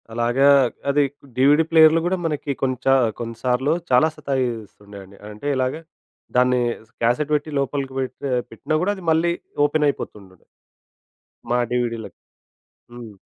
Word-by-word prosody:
అలాగా 120 +4 +1 0.4
అది 145 +1 +3 0.4
డీవీడీ 145 +4 +5
ప్లేయర్‌లు 160 0 +6
గూడా 185 +2 0
మనకి 150 -2 -2
కొంచ 130 -2 -2 0.3
కొన్నిసార్లు 125 +5 -1 0.2
చాలా 125 +4 +5
సతాయిస్తుండండి. 105 -7 -5
అంటే 105 +7 -8
ఇలాగా 130 +4 -1 0.6
దాన్ని 125 0 +3 0.3
స్ - - -34
క్యాసెట్ 125 +6 +1
పెట్టి 150 +1 -2
లోపలికి 140 0 -3
పెడ్త 130 -1 -5 0.3
పెట్టినా 140 +7 -3
గూడా 190 +3 +1
అది 190 - -11
మళ్ళీ 165 +2 +2 0.3
ఓపెన్ 150 +1 +1
అయిపోతుండుండె. 95 -9 -6 1.1
మా 120 - +2
డీవీడీ‌లకి. 120 -2 -3 0.7
హ్మ్. 115 -4 -11
130 Hz, 120 wpm, -22 LUFS, 120-150 Hz, 1.1 s, ప్లేయర్‌లు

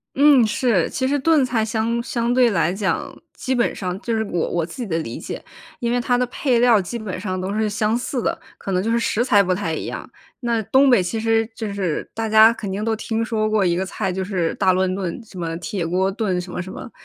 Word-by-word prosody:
嗯， 280 -4 +6
是， 215 -5 +1
其 260 - -1
实 285 +2 +1
炖 295 -1 +3
菜 230 -3 0
相 225 +2 -1
相 235 -1 -1
对 250 -1 +5
来 185 -4 +1
讲， 195 -1 -2 0.2
基 260 - -2
本 240 -2 +1
上 185 -1 -4
就 230 -1 -1
是 220 - 0
我 175 -5 -2
我 170 -2 -1
自 185 - -11
己 230 - -3
的 165 - -1
理 115 -8 -5
解， - - -7 0.4
因 235 -1 -1
为 245 0 +1
它 245 0 +1
的 250 - +1
配 250 0 0
料 235 -4 +5
基 210 +7 -5
本 205 -5 -5
上 185 -1 -3
都 190 +2 -3
是 215 0 0
相 215 +2 0
似 250 +1 -2
的， - - -1 0.2
可 195 - -5
能 185 0 +1
就 220 - -2
是 230 - +2
食 235 0 +1
材 210 -6 +4
不 185 -1 +1
太 180 -4 -2
一 - - -4
样。 - - -6 0.3
那 235 -3 0
东 265 +6 +4
北 235 -8 +5
其 220 +5 -2
实 225 0 +2
就 220 -2 -4
是 190 -6 -2
大 225 0 -2
家 220 +1 +7
肯 205 -4 -6
定 200 +2 -3
都 225 0 0
听 225 +1 -2
说 220 -1 0
过 215 -2 +2
一 175 -2 +2
个 185 +2 -1
菜， 190 0 -3
就 190 +1 -2
是 185 -4 -1
大 185 - +3
乱 185 0 +1
炖， 185 +1 -4
什 200 -4 -14
么 165 -1 -3
铁 175 +1 -3
锅 185 +3 +1
炖 195 -4 -1
什 180 0 -9
么 - - -3
什 185 - -9
么， - - -8
215 Hz, 280 characters per minute, -21 LUFS, 185-235 Hz, 0.4 s, 家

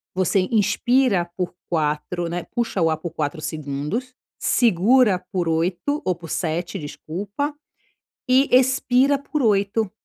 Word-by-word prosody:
Você 185 +1 +2
inspira 215 -2 +2
por 180 -1 -3 0.2
4, 160 +2 -1
né, 175 0 -4
puxa 230 -6 -1
o 165 - +3
ar 155 - 0
por 165 +2 -6
4 155 0 -3
segundos, 155 - -4 0.3
segura 225 -1 +3
por 175 -4 -1
8 180 - -1
o 185 -1 +1
por 165 -1 -11
7 175 +4 -2
desculpa, 200 - -5 0.8
e 260 +2 +4
expira 260 +1 +3
por 285 +1 -3
8. 205 -1 +1
190 Hz, 130 wpm, -22 LUFS, 165-245 Hz, 0.8 s, e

